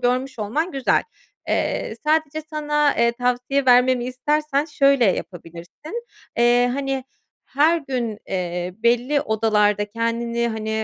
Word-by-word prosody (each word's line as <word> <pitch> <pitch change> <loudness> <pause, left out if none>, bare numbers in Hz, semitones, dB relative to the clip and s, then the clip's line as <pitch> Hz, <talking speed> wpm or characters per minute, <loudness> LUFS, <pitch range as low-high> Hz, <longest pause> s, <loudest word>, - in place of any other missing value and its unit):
görmüş 255 +1 -1
olman 295 - -2
güzel. 270 -2 +1 0.5
Eee, - - -1
sadece 310 0 +1
sana, 295 -1 +1
eee, 235 0 +3
tavsiye 250 +3 -1
vermemi 250 0 +4
istersen 295 +3 0
şöyle 275 -4 +3
yapabilirsin. 185 - -4 0.3
Eee, 240 +1 +4
hani, 270 -2 -2 0.4
her 310 +5 +2
gün, 245 -7 -3
eee, 180 -1 -3
belli 245 +5 +2
odalarda 210 -3 +1
kendini, 235 +1 -1
hani, 220 -1 -4
250 Hz, 115 wpm, -22 LUFS, 230-285 Hz, 0.5 s, vermemi